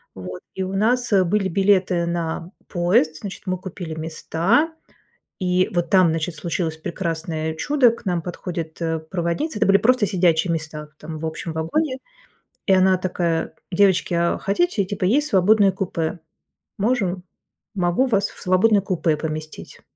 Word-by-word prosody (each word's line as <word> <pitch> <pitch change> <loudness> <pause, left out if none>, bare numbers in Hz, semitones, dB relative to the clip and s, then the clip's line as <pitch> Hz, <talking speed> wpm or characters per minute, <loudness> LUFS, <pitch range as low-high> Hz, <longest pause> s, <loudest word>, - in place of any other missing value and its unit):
Вот. 90 -1 -7
И 190 - -3
у 185 +1 -4
нас 240 +5 +1
были 195 +2 +1
билеты 190 -2 +2
на 170 0 -3 0.2
поезд, 175 -3 +1
значит, 200 -2 -7
мы 185 -1 -1
купили 175 -3 -7
места. 165 - 0 0.7
И 185 0 +1
вот 175 -2 0
там, 185 -3 +5
значит, 160 +1 -2
случилось 165 0 -2
прекрасное 160 -1 -3
чудо, 260 - +3
к 235 - -11
нам 175 -3 0
подходит, 170 -1 -6
э, 160 -1 -1
проводница. 175 - -2
Это 220 - +3
были 195 0 +6
просто 250 +1 +3
сидячие 175 -3 +2
места, 155 -1 -5
там, 155 +1 -7
в 160 - -4
общем 160 +1 -4
вагоне. 260 - -1 0.7
И 195 - +4
она 190 0 +5
такая: 175 -3 -1 0.2
"Девочки, 190 -1 +3
а 170 0 +1
хотите, 205 - +1
типа, 190 0 -4
есть 285 +11 +2
свободное 200 0 +4
купе? 175 -3 -3 0.6
Можем, 195 -5 0 0.5
могу 180 +5 +1
вас 205 -6 +1
в - - -15
свободное 200 +3 +3
купе 175 -5 0
поместить". 155 0 -6
180 Hz, 150 wpm, -22 LUFS, 165-200 Hz, 0.7 s, были